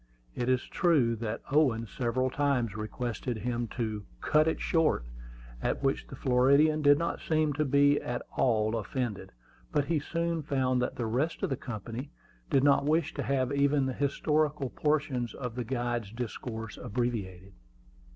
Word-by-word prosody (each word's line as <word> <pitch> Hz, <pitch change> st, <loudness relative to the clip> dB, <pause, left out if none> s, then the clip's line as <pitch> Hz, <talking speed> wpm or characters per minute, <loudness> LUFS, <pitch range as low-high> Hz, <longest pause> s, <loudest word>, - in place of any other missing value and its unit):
It 120 Hz, +1 st, -2 dB
is 130 Hz, -1 st, +2 dB
true 145 Hz, -10 st, +2 dB
that 115 Hz, 0 st, -4 dB
Owen 130 Hz, -6 st, +3 dB
several 125 Hz, +3 st, -1 dB
times 130 Hz, -7 st, 0 dB
requested 115 Hz, +2 st, -3 dB
him 120 Hz, +1 st, -2 dB
to 110 Hz, -3 st, -2 dB, 0.2 s
"cut 155 Hz, -, +3 dB
it 160 Hz, -, 0 dB
short," 160 Hz, -, +1 dB, 0.6 s
at -, -, -1 dB
which 135 Hz, 0 st, 0 dB
the -, -, -8 dB
Floridian 140 Hz, +5 st, +4 dB
did 145 Hz, -1 st, +6 dB
not 170 Hz, +2 st, -2 dB
seem 155 Hz, -2 st, +1 dB
to 155 Hz, +2 st, 0 dB
be 145 Hz, +1 st, +4 dB
at 120 Hz, 0 st, -3 dB
all 110 Hz, -3 st, +2 dB
offended; 115 Hz, -1 st, -3 dB, 0.4 s
but 145 Hz, -, +1 dB
he 160 Hz, +1 st, +1 dB
soon 170 Hz, +2 st, -2 dB
found 130 Hz, -4 st, +1 dB
that 125 Hz, -, -1 dB
the 120 Hz, -, -2 dB
rest 130 Hz, +9 st, -1 dB
of -, -, 0 dB
the -, -, +2 dB
company 120 Hz, +2 st, -6 dB, 0.4 s
did 135 Hz, -, +3 dB
not 140 Hz, -1 st, +5 dB
wish 160 Hz, +2 st, +1 dB
to -, -, -3 dB
have 130 Hz, -2 st, 0 dB
even 140 Hz, 0 st, +3 dB
the 130 Hz, -, -1 dB
historical 145 Hz, 0 st, 0 dB
portions 145 Hz, -5 st, 0 dB
of 125 Hz, -3 st, -5 dB
the 125 Hz, +1 st, -3 dB
guide's 120 Hz, -3 st, -2 dB
discourse 115 Hz, -1 st, -5 dB
abbreviated. 100 Hz, -6 st, -3 dB
130 Hz, 160 wpm, -30 LUFS, 115-145 Hz, 0.6 s, did